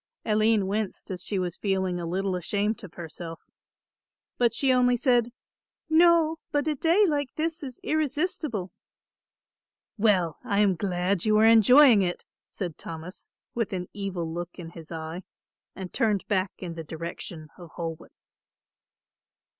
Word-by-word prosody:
Aline 215 -1 +3
winced, 205 0 -3
as 180 -2 -4
she 205 - -2
was 180 -1 -2
feeling 190 -3 -1
a 170 - -4
little 190 +2 -1
ashamed 205 +6 -1
of 190 - -11
herself, 165 0 -8 1.0
but 240 -1 +4
she 260 +2 +2
only 250 -1 +3
said, 240 -2 +2 0.6
"No, 330 -1 +5
but 290 +1 0
a 310 - +2
day 335 +8 +3
like 290 -6 -1
this 320 +1 -2
is 260 -4 -6
irresistible." 300 - -1 1.3
"Well, 185 -7 +2
I 215 -5 -1
am 205 -2 +4
glad 180 0 -1
you 215 0 +4
are 215 - +5
enjoying 230 +1 +7
it," 175 -2 -2 0.2
said 175 -5 -6
Thomas, 165 +3 -8 0.2
with 230 -4 -2
an 180 -1 -4
evil 195 -4 -3
look 175 +1 -6
in 165 -2 -8
his 165 -2 -12
eye, 160 +2 -5 0.5
and 190 -2 -7
turned 210 -4 +1
back 190 -2 +1
in 175 -3 -6
the 165 -1 -6
direction 160 0 -7
of 175 -2 -11
Holwick. 165 -2 -6
200 Hz, 145 wpm, -27 LUFS, 175-245 Hz, 1.3 s, enjoying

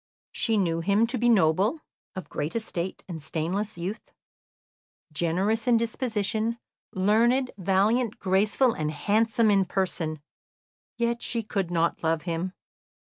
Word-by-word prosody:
She 225 -2 0
knew 170 -4 +1
him 200 +6 +3
to 240 +2 -3
be 240 +1 +3
noble, 200 - +3 0.4
of 185 -4 -6
great 150 +7 -4
estate 190 -5 -3
and 165 -4 -6
stainless 175 +7 -2
youth, 185 +6 -5 1.0
generous 190 +9 0
in 240 -2 +5
disposition, 225 -1 -1 0.3
learned, 235 +7 +2
valiant, 205 +5 +1
graceful, 205 +6 +2
and 155 -1 -2
handsome 215 +7 +2
in 195 -1 +4
person. 170 -4 -2 0.8
Yet 235 0 0
she 230 -2 -2
could 195 -4 -2
not 170 -1 0
love 160 0 +1
him. 175 +2 -3
200 Hz, 130 wpm, -26 LUFS, 170-230 Hz, 1.0 s, in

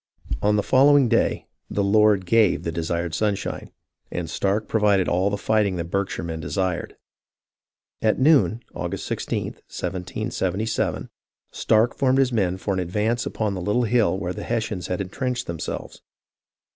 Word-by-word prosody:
On 105 +1 +3
the 105 - +1
following 140 0 +5
day 115 0 +1
" - - -58
the 100 - 0
Lord 105 -1 +4
gave 105 +1 +3
the 85 - -2
desired 85 0 -2
sun 105 +4 +1
shine," - - -6 0.4
and 85 -1 -4
Stark 100 +5 -1
provided 105 -4 +2
all 90 +3 +2
the 100 - -2
fighting 105 -2 +1
the 85 - -2
Berkshire 100 +1 -2
men 80 -1 -4
desired. 90 +1 -2 1.1
At 110 -1 +2
noon 130 -5 +3
(August - - -4
i6, - - -4 0.4
1777) 95 +3 -3 0.4
Stark 110 +2 +2
formed 130 -1 +2
his 130 -2 +2
men 95 -5 +1
for 100 +1 -2
an 95 - -1
advance 105 +7 -1
upon 105 -2 -2
the 95 - -4
little 105 +6 +1
hill 115 -4 +2
where 90 -2 -3
the - - -7
Hes 115 -1 -1
sians 90 -4 -5
had 90 +1 -2
entrenched 125 +6 -3
themselves. 85 -1 -6
100 Hz, 160 wpm, -23 LUFS, 90-115 Hz, 1.1 s, following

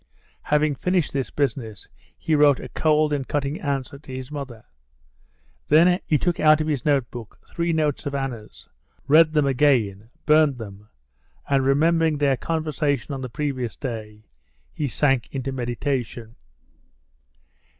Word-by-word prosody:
Having 150 0 +1
finished 180 +3 -1
this 135 -2 -2
business, 115 -7 -3 0.3
he 160 - -2
wrote 145 -2 +5
a - - -8
cold 155 -1 +2
and 140 -3 -2
cutting 145 +1 -2
answer 140 -1 -3
to 135 - -13
his 130 +1 -7
mother. 135 -6 -7 1.0
Then 175 +4 +5
he 150 - +3
took 175 +4 -1
out 155 0 +5
of 155 - -1
his 150 -5 -2
notebook 125 -6 -2
three 170 0 -2
notes 150 -2 0
of 140 - -3
Anna's, 125 -6 -6 0.4
read 155 +2 +6
them 150 -2 +3
again, 120 -7 +1 0.2
burned 150 -3 +4
them, 105 -2 -10 0.6
and 140 -2 +2
remembering 160 +3 +2
their 140 -2 +2
conversation 150 -3 -2
on 135 - -5
the 130 - -5
previous 130 -2 -3
day, 110 -4 -7 0.5
he 150 - -2
sank 135 0 +1
into 135 -1 -4
meditation. 120 -2 -3
140 Hz, 140 wpm, -23 LUFS, 125-150 Hz, 1.0 s, read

